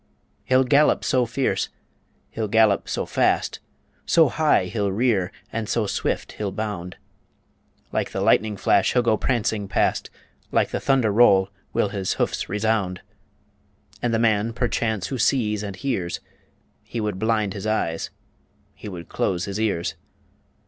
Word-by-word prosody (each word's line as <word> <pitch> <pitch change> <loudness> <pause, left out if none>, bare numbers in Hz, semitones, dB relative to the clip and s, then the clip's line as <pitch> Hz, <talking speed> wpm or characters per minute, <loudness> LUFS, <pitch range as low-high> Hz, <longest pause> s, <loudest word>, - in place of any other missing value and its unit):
He'll 130 0 +4
gallop 145 +3 +3
so 125 -2 +2
fierce, 130 +3 -1 0.6
he'll 110 -1 -2
gallop 110 -1 +3
so - - -1
fast, - - +1 0.4
So 160 -4 +4
high 150 -9 +2
he'll 100 +1 -1
rear, 100 -4 +1 0.2
and 110 -2 -3
so 115 -2 +1
swift - - -2
he'll 105 -2 -4
bound 95 -4 -5 0.9
Like - - -1
the - - -4
lightning 105 -2 +2
flash - - +3
he'll 125 - +3
go 115 -2 +3
prancing 110 -4 -1
past, 95 - 0 0.4
Like - - +2
the - - -1
thunder 130 -6 +2
roll 100 -4 +5 0.2
will 105 - +1
his 100 -2 -2
hoofs - - -2
resound 105 -3 0 1.0
And 120 - 0
the 115 - +2
man 110 0 +2
perchance 110 -4 -1
who 130 - -3
sees 110 -4 +1
and 100 -2 -5
hears, 100 -11 -2 0.6
He 120 - -6
would 105 -3 -2
blind 110 -2 +1
his 100 +1 -5
eyes, 85 -7 -1 0.6
he 105 - -9
would 85 -4 -8
close 90 -1 -1
his 100 +1 -4
ears. 100 -6 0
110 Hz, 150 wpm, -23 LUFS, 100-120 Hz, 1.0 s, roll